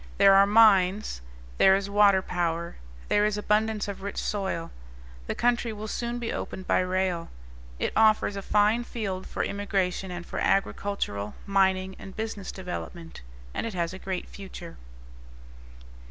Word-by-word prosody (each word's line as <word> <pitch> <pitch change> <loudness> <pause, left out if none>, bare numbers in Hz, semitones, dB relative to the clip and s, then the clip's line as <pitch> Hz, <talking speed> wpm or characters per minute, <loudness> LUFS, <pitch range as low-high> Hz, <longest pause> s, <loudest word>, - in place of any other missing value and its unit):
There 195 - +7
are 195 +1 +6
mines; 205 - +4 0.4
there 190 0 +7
is 195 0 -1
water 200 -2 +4
power; 170 -2 -2 0.3
there 205 - +3
is 210 0 +1
abundance 210 +1 +1
of 200 -1 -6
rich 200 +1 -5
soil. 190 -5 -2 0.6
The - - -2
country 240 -1 +1
will 215 0 -6
soon 235 +2 -3
be 235 -1 -3
opened 190 - -5
by - - +2
rail. 185 -2 -1 0.5
It - - -2
offers 215 -2 +4
a 200 - -4
fine 210 +4 +2
field 200 -6 -4
for - - -2
immigration 195 -2 -1
and 175 -1 -6
for - - -5
agricultural, 195 - -1
mining, 190 -1 +2
and 195 - -10
business 215 -3 -4
development; 175 -2 -7 0.3
and - - -2
it 220 - -6
has 170 0 -1
a 185 - -8
great 190 -1 -4
future. 185 -3 -10
195 Hz, 155 wpm, -27 LUFS, 185-210 Hz, 0.6 s, There